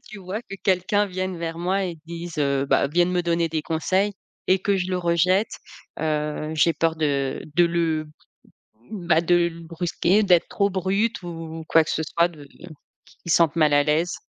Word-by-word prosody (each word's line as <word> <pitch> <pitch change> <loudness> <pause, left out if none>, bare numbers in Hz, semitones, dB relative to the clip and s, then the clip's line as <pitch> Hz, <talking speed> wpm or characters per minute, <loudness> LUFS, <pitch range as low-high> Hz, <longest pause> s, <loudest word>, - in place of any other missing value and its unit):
tu 215 - -10
vois? 195 +5 -5
Que 195 - -9
quelqu'un 195 +2 +2
vienne 185 -1 -4
vers 165 0 -4
moi 190 +3 0
et 175 -2 -4
dise 170 -1 -7
heu, 140 -1 +1
ben 140 - +2
vienne 175 +4 +2
me 180 -1 0
donner 170 -1 0
des 160 -1 -2
conseils 185 +6 0 0.4
et 185 - +4
que 200 +1 0
je 185 0 -2
le 185 - 0
rejette, 180 +4 +1 0.4
heu, 150 0 -2
j'ai 165 +2 +3
peur 165 +1 0
de 140 -3 -1
de 175 - +5
le 165 -2 0 0.9
bah, 175 -6 +1
de 175 +1 +3
le 170 0 -8
brusquer, 175 +4 0
d'être 180 -4 +4
trop 200 -1 +1
brute 195 +4 -1
ou 165 -1 -7
quoi 165 - +5
que - - -8
ce 160 - -1
soit, 170 +3 +2
de 155 -5 -13 0.6
qu'il 170 - -10
sente 165 -1 +3
mal 155 -2 +3
à 145 0 +5
l'aise. 155 +4 0
170 Hz, 190 wpm, -23 LUFS, 160-185 Hz, 0.9 s, de